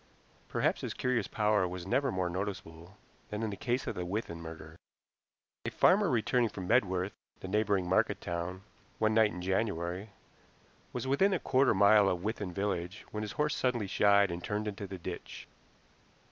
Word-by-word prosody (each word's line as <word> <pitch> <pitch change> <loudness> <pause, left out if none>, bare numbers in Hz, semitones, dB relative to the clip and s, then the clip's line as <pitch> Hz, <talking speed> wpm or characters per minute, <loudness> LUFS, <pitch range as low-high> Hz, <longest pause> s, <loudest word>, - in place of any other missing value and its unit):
Perhaps - - +1
his - - -4
curious 125 -5 0
power 105 -3 +2
was 90 0 -6
never 135 +7 +1
more 95 -1 0
noticeable 90 -1 -5 0.3
than 105 +1 -3
in 110 - -1
the - - -4
case 125 +5 -1
of - - -2
the 90 - -4
Withan 90 -2 -4
murder. 80 0 -9 0.9
A - - -2
farmer 195 +1 +4
returning 120 -1 +2
from 95 -3 -6
Medworth, 95 0 +2 0.3
the - - -6
neighboring 100 -2 +1
market 95 - +2
town, 85 +2 -4 0.3
one 110 0 +2
night 110 -1 +5
in 90 -3 -7
January, 95 0 -1 0.8
was - - -4
within 165 +10 +3
a 180 - +1
quarter 135 +1 +3
of 105 - +2
a - - -1
mile 100 0 +6
of 90 0 -2
Withan 105 -3 -3
village 95 0 -3
when 105 - -3
his 105 -1 -4
horse 150 0 0
suddenly 125 -4 0
shied 100 0 +4
and 85 0 -5
turned 105 +1 -2
into 100 -1 -5
the 95 0 -6
ditch. 85 - -7
100 Hz, 180 wpm, -31 LUFS, 90-110 Hz, 0.9 s, mile